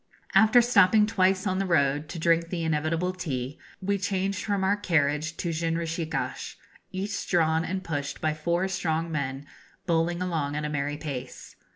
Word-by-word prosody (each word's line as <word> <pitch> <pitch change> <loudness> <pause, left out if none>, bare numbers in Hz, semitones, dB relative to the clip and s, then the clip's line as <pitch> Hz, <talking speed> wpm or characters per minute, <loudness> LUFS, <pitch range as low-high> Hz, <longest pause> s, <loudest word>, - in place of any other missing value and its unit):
After 230 +2 +6
stopping 215 -3 +5
twice 190 -2 +2
on 185 -1 0
the 195 - 0
road, 145 -2 +2
to 170 - -6
drink 165 0 +2
the 170 -2 -3
inevitable 160 +3 0
tea, 145 -6 -4 0.2
we 200 +1 0
changed 195 0 -1
from 200 -2 0
our 195 +2 +3
carriage 155 -5 0
to 170 - -2
jinrikishas, 165 0 -2 0.4
each 195 +1 -3
drawn 160 -2 +3
and 190 +2 -3
pushed 145 -4 -3
by 155 -1 0
four 170 +4 0
strong 165 -3 -1
men, 140 -2 -3 0.4
bowling 170 0 +1
along 160 -6 -1
at 150 0 -2
a - - -2
merry 145 0 -2
pace. 145 -5 -7
165 Hz, 165 wpm, -27 LUFS, 155-185 Hz, 0.4 s, After